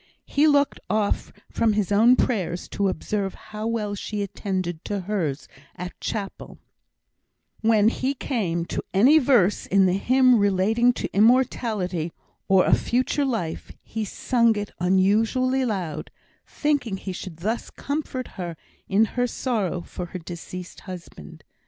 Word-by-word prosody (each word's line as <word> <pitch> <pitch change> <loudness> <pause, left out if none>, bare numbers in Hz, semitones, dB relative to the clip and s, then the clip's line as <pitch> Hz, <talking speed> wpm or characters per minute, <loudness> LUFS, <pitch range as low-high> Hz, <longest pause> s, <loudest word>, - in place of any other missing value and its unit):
He 295 +2 +3
looked 285 -1 +3
off 210 -1 0 0.2
from 225 -2 +2
his 205 -1 0
own 225 +5 +6
prayers 185 -9 -1
to 200 - 0
observe 195 +2 -2
how 215 +1 -6
well 215 -3 -1
she 205 +1 -3
attended 185 -4 -3
to 205 -2 -2
hers 175 -8 -2 0.3
at 180 +1 -6
chapel; 200 -3 -5 1.0
when 220 -2 +4
he 260 +4 0
came 180 -11 -2
to - - -4
any 265 +11 +7
verse 240 - +3
in 195 0 +4
the 180 - +3
hymn 250 +4 +4
relating 205 +5 +3
to - - -5
immortality 215 -7 +2 0.4
or 190 -1 +5
a - - +3
future 255 +4 +1
life, 220 -11 -3
he 220 0 -4
sang 230 +2 +2
it 205 0 -4
unusually 220 +8 +2
loud, 175 -9 -3 0.4
thinking 275 -9 -1
he 190 0 -6
should 180 -3 -7
thus 215 +7 -2
comfort 280 -3 -4
her 175 -4 -6 0.3
in 205 +3 +4
her 245 +3 -1
sorrow 215 -8 -2
for 180 +1 -7
her 185 - -6
deceased 175 +1 -8
husband. 175 - -10
210 Hz, 140 wpm, -24 LUFS, 185-240 Hz, 1.0 s, any